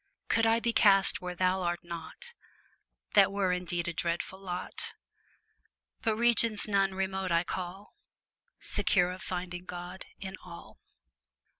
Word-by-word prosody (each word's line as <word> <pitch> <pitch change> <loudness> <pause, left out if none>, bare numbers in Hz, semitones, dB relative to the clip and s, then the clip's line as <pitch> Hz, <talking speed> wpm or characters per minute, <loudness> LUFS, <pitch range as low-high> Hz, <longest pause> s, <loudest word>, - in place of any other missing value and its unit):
Could 225 0 +4
I 225 +1 +4
be 235 0 0
cast 195 -3 +5
where 180 0 -4
Thou 185 +1 +2
art 175 -1 -1
not, 170 - -7 0.8
That 200 -3 +6
were 195 -2 +1
indeed 175 -1 -2
a 175 - -2
dreadful 170 +3 -2
lot; 180 -2 -4 1.1
But 225 -3 +1
regions 230 -2 +3
none 195 -2 +2
remote 190 -1 -1
I 170 0 +3
call, 185 +3 -6 0.6
Secure 180 -2 +2
of 185 0 -8
finding 180 0 -5
God 180 +1 -7
in 190 -1 -7
all. 170 -2 -11
185 Hz, 135 wpm, -30 LUFS, 175-200 Hz, 1.1 s, That